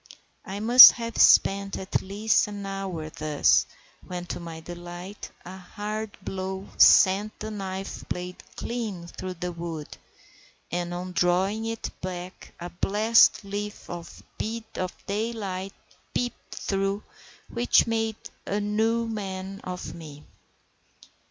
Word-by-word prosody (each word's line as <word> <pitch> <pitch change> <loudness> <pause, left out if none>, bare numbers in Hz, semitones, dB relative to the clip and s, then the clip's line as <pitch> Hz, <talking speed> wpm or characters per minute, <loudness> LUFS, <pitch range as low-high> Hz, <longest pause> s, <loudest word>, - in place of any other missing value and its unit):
I 200 0 -5
must 240 +3 +11
have 230 -2 -5
spent 195 0 +5
at 190 - -2
least 205 +3 +1
an 205 -1 -6
hour 190 -5 -5
thus, 150 -1 +2 0.4
when, 180 -1 -6
to - - -6
my 165 -2 -8
delight, 175 +3 -8 0.2
a 185 +2 -8
hard 210 +4 -5
blow 190 0 -4
sent 205 +2 +5
the 215 0 -5
knife 195 -2 -6
blade 180 0 -5
clean 220 -8 -4
through 185 +1 -7
the 180 +1 -4
wood, 165 -3 -6 0.8
and 175 0 -2
on 180 +1 -5
drawing 185 +5 +1
it 225 0 -4
back 180 0 -7
a 175 +1 -7
blessed 215 +4 +4
little 200 -3 -6 0.4
bit 225 +1 -3
of 185 -1 -5
daylight 200 -3 -3 0.4
peeped 245 -1 -3
through, 195 +1 -1 0.4
which 240 +1 +3
made 225 -1 -1 0.3
a 205 - 0
new 220 +3 +1
man 195 -3 -5
of 180 0 -6
me. 150 -3 -11
195 Hz, 125 wpm, -26 LUFS, 180-215 Hz, 0.8 s, must